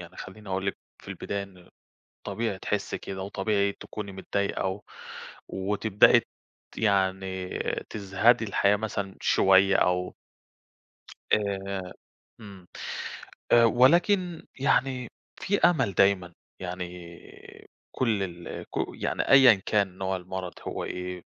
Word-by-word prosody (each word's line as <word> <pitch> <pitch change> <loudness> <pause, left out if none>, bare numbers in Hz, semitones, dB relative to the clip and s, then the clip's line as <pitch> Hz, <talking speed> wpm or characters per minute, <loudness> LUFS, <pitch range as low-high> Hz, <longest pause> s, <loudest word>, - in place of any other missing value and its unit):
يعني 85 -1 -12
خلّيني 105 +2 -10
أقول 95 0 -2
لِك 100 - -1 0.3
في - - -13
البداية 100 0 -4
إن، 90 -3 -14 0.6
طبيعي 110 -4 -3
تحسّي 105 0 -2
كده 95 -1 -7
وطبيعي 100 +1 0
تكوني 105 -1 -8
متضايقة، 95 0 -2
و 95 +2 -3 0.7
وتبدئي 100 +2 +4
ت - - -13 0.5
يعني 95 -2 0 0.3
تزهدي 110 +3 +2
الحياة 100 0 +3
مثلًا 100 -2 -4
شوية، 95 0 +4
أو 90 0 +1 1.2
آآ، 95 -2 -1 0.5
إمم، 100 -4 -12 0.9
آآ 120 0 +7
ولكن 170 - +3
يعني 130 -2 +1 0.3
في 200 +1 0
أمل 160 - +3
دايمًا، 95 -3 +2 0.3
يعني 90 -1 -4 1.1
كلّ 110 -6 +1
ال 85 -2 -6
ك - - -15 0.2
يعني - - -2
أيًا 130 -8 +7
كان 100 -3 +1
نوع 95 0 -1
المرض 90 0 -6
هو - - -4
إيه، 90 0 -5
100 Hz, 115 wpm, -27 LUFS, 95-110 Hz, 1.2 s, آآ